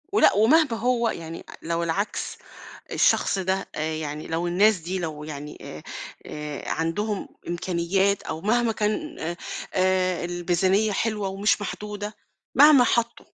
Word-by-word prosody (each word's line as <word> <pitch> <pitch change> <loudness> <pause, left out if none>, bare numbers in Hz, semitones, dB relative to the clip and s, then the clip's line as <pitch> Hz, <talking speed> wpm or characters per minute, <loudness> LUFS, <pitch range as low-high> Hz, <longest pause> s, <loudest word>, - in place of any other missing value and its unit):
ولأ 410 - +6
ومهما 265 +6 +4
هو 235 0 +1
يعني 165 -4 -6 0.2
لو 170 +1 -1
العكس، 190 +5 -2 0.5
الشخص 195 - +3
ده 190 +1 -1
آآ، 155 +1 -1
يعني 150 -1 -5
لو 165 +2 -1
الناس 200 +4 +4
دي 180 +3 -4
لو 155 -3 -4
يعني 150 -1 -7
آآ، 75 - -9 0.4
آآ، 150 -2 -6
عندهم 195 +6 -1 0.2
إمكانيات 180 +3 0
أو 160 0 -5
مهما 235 +3 +2
كان 220 +10 -2
آآ، 170 +2 -3 0.4
آآ، 185 -1 +2
الميزانيّة 180 +4 +1
حلوة 210 0 -1
ومش 200 +2 +1
محدودة، 210 +1 -5 0.4
مهما 285 -1 +8
حطوا، 235 0 0
190 Hz, 135 wpm, -25 LUFS, 165-215 Hz, 0.5 s, مهما